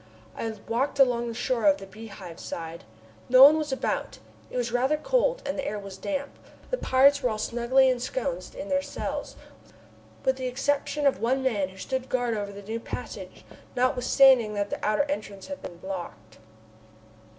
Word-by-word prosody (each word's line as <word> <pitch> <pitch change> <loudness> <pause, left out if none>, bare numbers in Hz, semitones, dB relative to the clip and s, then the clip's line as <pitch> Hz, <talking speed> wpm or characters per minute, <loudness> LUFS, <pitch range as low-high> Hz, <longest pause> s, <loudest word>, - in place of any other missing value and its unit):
I 225 - -3 0.2
walked 255 +5 0
along 245 -3 +3
the 230 - -5
shore 245 +2 0
on 295 -1 +5
the 195 - -9
Beehive 195 -4 -10
side. 165 -4 -7 0.4
No 255 +1 +9
one 300 +3 +9
was 300 -2 -3
about. 265 - -2 0.3
It - - -5
was 240 -1 -1
rather 260 +5 +2
cold, - - +1
and 280 0 -3
the - - -1
air 210 - -2
was 200 -2 -8
damp. 280 +7 -4 0.3
The - - 0
pirates 280 +2 +4
were 250 - +1
all 215 - -2
snugly 240 +4 +3
ensconced 265 - -2
in 290 - -6
their 280 -1 +1
cells, - - -5 0.9
with 265 0 +2
the 260 -1 -3
exception 285 +3 -1
of 275 - +3
one 260 +3 +1
man, 205 -8 0
who 190 - -15
stood 260 +5 -3
guard 245 -2 0
over 205 -1 -3
the 200 0 -10
new 220 +3 -4
passage, - - -8 0.3
notwithstanding 250 -2 +4
that 205 0 -2
the - - -4
outer 215 +6 +2
entrance 215 -9 -5
had 285 0 -7
been 175 - -8
blocked. 175 - -8
250 Hz, 180 wpm, -27 LUFS, 210-280 Hz, 0.9 s, No